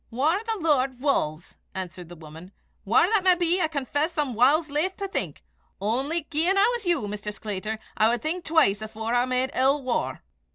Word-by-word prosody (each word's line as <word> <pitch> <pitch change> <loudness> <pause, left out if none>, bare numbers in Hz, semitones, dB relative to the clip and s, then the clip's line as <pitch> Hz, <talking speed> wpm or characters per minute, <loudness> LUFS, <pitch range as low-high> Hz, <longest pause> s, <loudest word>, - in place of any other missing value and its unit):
"Whaur 305 - +1
the 450 -1 -1
Lord 270 -6 +1
wulls," 175 - -1 0.2
answered 180 -2 -6
the 175 - -10
woman. 160 +3 -12 0.4
"Whaur 230 - +5
that 430 -3 +2
may 370 -1 +5
be, 350 +1 +1
I 320 - +2
confess 300 +2 -2
I'm 290 -4 0
whiles 285 +7 +3
laith 335 +6 -1
to 395 - -4
think. 390 - -4 0.4
Only 265 - -1
gien 335 +6 +1
I 400 +2 +5
was 465 -6 -3
you, 330 -12 +1
Maister 210 0 -5
Sclater, 210 +1 -4 0.2
I 215 +1 +4
wad 235 -1 -1
think 340 +3 -2
twise 290 -11 +3
afore 220 +1 -4
I 245 0 +3
made 255 +1 0
ill 270 +2 +2
waur." 255 -2 -2
265 Hz, 195 wpm, -25 LUFS, 215-330 Hz, 0.4 s, Whaur